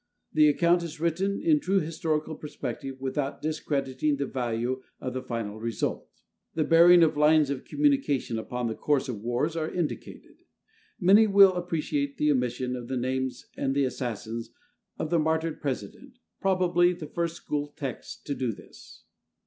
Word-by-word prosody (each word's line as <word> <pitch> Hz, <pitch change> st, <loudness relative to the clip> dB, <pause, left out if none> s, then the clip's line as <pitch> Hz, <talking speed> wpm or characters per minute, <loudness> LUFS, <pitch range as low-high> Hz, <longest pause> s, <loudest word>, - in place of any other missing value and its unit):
The 150 Hz, -1 st, +6 dB
account 170 Hz, +3 st, +3 dB
is 165 Hz, -2 st, -7 dB
written 185 Hz, +5 st, 0 dB
in 310 Hz, -1 st, +3 dB
true 195 Hz, -8 st, +1 dB
historical 155 Hz, -1 st, -2 dB
perspective 135 Hz, -3 st, -6 dB
without 135 Hz, +1 st, -2 dB
discrediting 145 Hz, -2 st, -1 dB
the 140 Hz, -, -1 dB
value 125 Hz, 0 st, -2 dB, 0.2 s
of 130 Hz, -, -4 dB
the 130 Hz, -, -3 dB
final 115 Hz, -4 st, -4 dB
result. 115 Hz, 0 st, -3 dB, 0.5 s
The 160 Hz, -, +2 dB
bearing 170 Hz, +2 st, +7 dB
of 160 Hz, -1 st, +3 dB
lines 150 Hz, -1 st, +4 dB
of 140 Hz, -, -4 dB
communication 275 Hz, -, +1 dB
upon 125 Hz, +2 st, -4 dB
the 115 Hz, -, -1 dB
course 145 Hz, +3 st, 0 dB
of 115 Hz, -6 st, -5 dB
wars 120 Hz, +8 st, -1 dB
are 160 Hz, -1 st, -1 dB
indicated. 175 Hz, -4 st, -5 dB, 0.6 s
Many 205 Hz, +3 st, +6 dB
will 195 Hz, -2 st, +7 dB
appreciate 155 Hz, -5 st, -2 dB
the 150 Hz, 0 st, +3 dB
omission 125 Hz, -1 st, -1 dB
of 120 Hz, -1 st, -7 dB
the 130 Hz, 0 st, -2 dB
names 130 Hz, +1 st, -2 dB
of 135 Hz, 0 st, -1 dB
the 140 Hz, -, +3 dB
assassins 115 Hz, -3 st, -4 dB, 0.5 s
of 155 Hz, -, -3 dB
the 170 Hz, -, +3 dB
martyred 160 Hz, +1 st, 0 dB
President, 145 Hz, -, -5 dB, 0.2 s
probably 180 Hz, -2 st, +3 dB
the 170 Hz, -3 st, -8 dB
first 170 Hz, +2 st, -3 dB
school 145 Hz, -3 st, -3 dB
text 140 Hz, -4 st, -7 dB
to 145 Hz, -, -2 dB
do 130 Hz, -4 st, -1 dB
this. -, -, -14 dB
150 Hz, 160 wpm, -27 LUFS, 130-170 Hz, 0.6 s, bearing